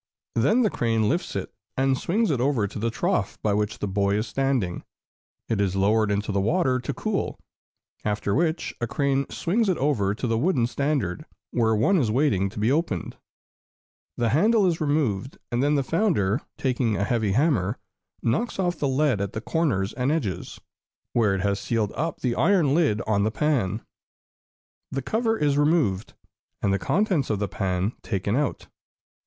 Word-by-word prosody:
Then 145 - +3
the 215 - +2
crane 115 -2 +1
lifts 170 - -1
it - - -4 0.2
and 135 0 +3
swings 200 - 0
it 130 -4 0
over 130 -5 +2
to 100 - -6
the 115 +2 0
trough 115 - -1
by 105 - +2
which 105 +1 -1
the 105 - -3
boy 100 +1 +1
is 105 +2 0
standing. 130 -10 -1 0.6
It 110 -3 0
is 95 -2 0
lowered 105 +2 +2
into 105 +1 -1
the 100 -1 +1
water 130 - +2
to 125 - -3
cool, - - -2 0.7
after 105 -1 -1
which 160 +2 0
a 120 - 0
crane 140 +2 0
swings 210 +5 0
it 185 - +1
over 110 -8 +1
to 120 - -4
the 115 -1 +1
wooden 140 -6 +2
standard, 125 -6 -1 0.3
where 110 -2 +2
one 170 - +3
is 120 -7 +1
waiting 105 -6 +2
to 100 - -13
be 110 +4 +2
opened. 140 - -1 1.0
The 120 -1 +1
handle 210 - +4
is 170 -3 0
removed, 145 -6 0
and 120 +1 +1
then 145 +2 +2
the 140 - +2
founder, 145 - +1 0.2
taking 125 -5 0
a - - 0
heavy 110 -3 0
hammer, 120 - +1 0.5
knocks 130 - 0
off 175 -3 -1
the 145 - +1
lead 135 -5 +1
at 100 - -3
the - - -3
corners 115 - 0
and 130 +2 0
edges, 115 - -3 0.5
where 110 -5 +3
it 95 - -2
has 100 0 0
sealed 110 -2 -1
up 165 +1 -3
the 125 -2 0
iron 155 - +3
lid 145 -9 +2
on 100 -2 +1
the 110 - +2
pan. 115 -6 0 1.1
The 135 -1 -3
cover 225 - 0
is 145 -4 +2
removed, 145 - +1 0.4
and 100 - +1
the 100 - +1
contents 180 - +1
of 105 - +1
the 100 0 -1
pan 95 +2 -1
taken 100 0 -1
out. 145 0 -1
120 Hz, 180 wpm, -25 LUFS, 105-150 Hz, 1.1 s, handle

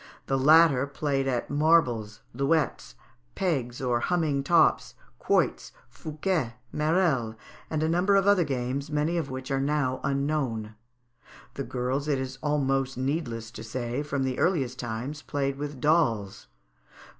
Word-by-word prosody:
The 135 - 0
latter 140 -1 +5
played 140 -1 -1
at 125 0 -2
marbles, 130 -9 +2
luettes, 140 - 0 0.4
peg 130 -10 -1
or 120 -2 +1
humming 155 -2 0
tops, 170 +4 +3 0.2
quoits, - - 0 0.2
fouquet, 155 -5 -2 0.2
merelles, 150 -8 +1 0.3
and 155 -1 -1
a - - +2
number 180 +5 +2
of 195 -1 +3
other 200 -3 +5
games, 135 0 -3
many 150 +3 0
of 160 -5 -2
which 130 +1 -6
are 135 - +1
now 140 -2 0
unknown. 135 -6 -1 0.8
The 140 - -4
girls, 130 +3 -2
it 145 -2 +1
is 130 0 -5
almost 135 -3 0
needless 130 -5 -3
to - - -9
say, 120 +3 -3
from 140 -2 -2
the 130 -1 -2
earliest 135 -9 0
times 125 +6 -4
played 140 -2 -2
with 145 -2 -5
dolls. 115 - +1
140 Hz, 140 wpm, -27 LUFS, 125-155 Hz, 0.8 s, latter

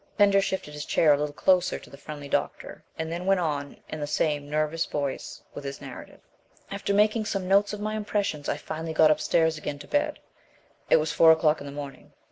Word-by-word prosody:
Pender 200 -1 +5
shifted 190 -6 -3
his 150 0 -6
chair 155 -3 +4
a - - +2
little 150 0 -2
closer 180 +4 +2
to - - -14
the - - -10
friendly 145 0 -8
doctor - - -3
and 160 0 -3
then 175 +2 -4
went 195 -1 +4
on 145 -4 -2
in 155 - -6
the 145 - -3
same 145 -1 0
nervous 155 +2 0
voice 140 -2 -4
with - - -7
his 140 0 -6
narrative. 135 -3 -10 0.5
"After 200 0 -3
making 215 +2 +3
some 195 -3 -2
notes 200 +2 +4
of 210 - -5
my 215 +1 -2
impressions 205 -8 -2
I - - 0
finally 160 +1 -5
got 155 0 +6
upstairs 160 +1 +2
again 145 -2 -4
to 145 - -12
bed. 295 +1 0 0.7
It - - +7
was 155 0 0
four 165 -1 +7
o'clock 160 -1 +3
in 145 - -7
the - - -6
morning. 140 -1 -9
160 Hz, 215 wpm, -26 LUFS, 145-195 Hz, 0.7 s, It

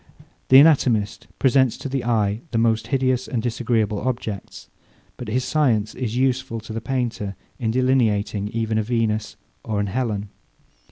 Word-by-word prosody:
The 130 - +8
anatomist 125 -8 +4
presents 130 -2 +3
to - - -6
the 135 -1 -2
eye 110 -2 0
the 115 - -2
most 115 -1 +1
hideous 130 0 0
and 125 - -2
disagreeable 115 -3 0
objects; 115 -6 -4 0.5
but - - -8
his 125 +4 -1
science 120 -10 +1
is 120 -3 -4
useful 130 -3 0
to 110 0 -8
the 115 - -4
painter 115 -5 -2 0.2
in 115 -3 -1
delineating 110 -5 +1
even 110 0 -1
a - - +2
Venus 110 -2 -1 0.3
or 105 -2 -2
an 100 - 0
Helen. 105 -2 -2
115 Hz, 155 wpm, -22 LUFS, 110-130 Hz, 0.5 s, The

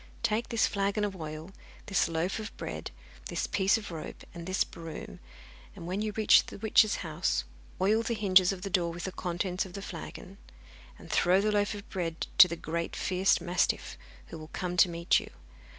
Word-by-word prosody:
Take 220 +2 0
this 230 - +3
flagon 200 +1 0
of 205 -2 -2
oil, 155 +1 -7 0.3
this 195 - +2
loaf 165 +6 -1
of 215 0 -7
bread, - - -5 0.4
this - - -2
piece 195 +2 +2
of 210 -4 -7
rope, 160 -2 -7
and 170 -1 -8
this 185 +1 +2
broom. 165 -2 -9 0.6
When 180 +4 -4
you 215 0 -1
reach 215 -1 +5
the - - -8
witch's 215 0 +4
house, 160 - 0 0.4
oil 210 +4 +3
the 230 0 -2
hinges 190 -3 +5
of 185 -2 -6
the 195 - -4
door 170 -2 +1
with 175 +1 -7
the 190 - -3
contents 180 +1 -2
of 185 - -10
the 200 - -5
flagon, 195 0 -8 0.6
and - - -11
throw 180 +2 +4
the 210 +2 +1
loaf 205 0 +1
of 205 0 -9
bread 165 -4 -3
to 180 - +12
the 170 - -4
great 170 0 -4
fierce 185 +1 +2
mastiff, 175 0 0 0.3
who - - -8
will 155 - -9
come 180 -1 -3
to 175 - +6
meet 170 +1 +2
you. - - -9
185 Hz, 195 wpm, -30 LUFS, 170-205 Hz, 0.6 s, to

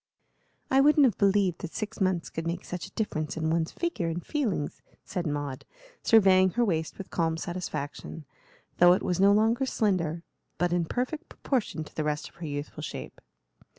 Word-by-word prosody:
"I 265 +1 +6
wouldn't 295 0 +6
have 230 -8 +1
believed 195 -3 +3
that 170 - -7
six 215 -1 -4
months 185 -3 +1
could 165 +1 -4
make 170 +2 -3
such 180 +1 -5
a - - -17
difference 155 -8 -2
in 160 0 0
one's 165 -1 0
figure 340 - -2
and 165 +1 -3
feelings," 220 - -2 0.2
said 180 -4 -3
Maud, 145 -2 -3 0.4
surveying 190 -4 +6
her 240 0 +2
waist 160 -6 -1
with 195 - -8
calm 165 -2 0
satisfaction, 165 -3 -5 0.5
though 175 0 +8
it 185 - 0
was 180 0 0
no 200 +1 +6
longer 225 +5 +3
slender, 170 -9 0 0.3
but 175 0 +1
in 175 -1 +1
perfect 255 - -3
proportion 235 - -2
to - - -14
the 155 - -1
rest 150 0 -2
of - - -27
her 170 - -6
youthful 145 0 -5
shape. - - -7
180 Hz, 185 wpm, -28 LUFS, 160-215 Hz, 0.5 s, though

